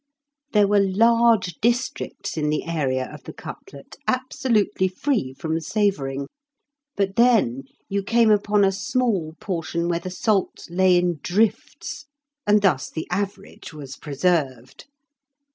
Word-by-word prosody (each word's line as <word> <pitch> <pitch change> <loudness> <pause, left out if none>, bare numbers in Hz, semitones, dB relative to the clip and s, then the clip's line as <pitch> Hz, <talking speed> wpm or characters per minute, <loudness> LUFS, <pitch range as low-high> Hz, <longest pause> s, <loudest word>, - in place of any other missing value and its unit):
There 210 -2 +5
were 205 0 +4
large 220 -1 +3
districts 235 -3 -1
in 150 -2 0
the 150 - -1
area 135 -6 -1
of - - -11
the - - -8
cutlet 140 -1 -11
absolutely 255 -7 +1
free 185 - -1
from 160 +4 -3
savouring. 150 -8 -1 0.7
But 195 -1 -1
then 220 - +3 0.2
you 200 0 -1
came 230 +2 +3
upon 210 0 +3
a 195 - +4
small 195 -6 -1
portion 170 -3 -2
where 170 -1 0
the 185 - -6
salt 195 +1 -1
lay 185 0 +4
in 175 -3 0
drifts, 215 +8 -1 0.4
and 210 0 +4
thus 150 -9 +2
the 160 - -5
average 195 -3 -4
was 140 -3 -8
preserved. 140 -4 -2
190 Hz, 130 wpm, -23 LUFS, 160-210 Hz, 0.7 s, There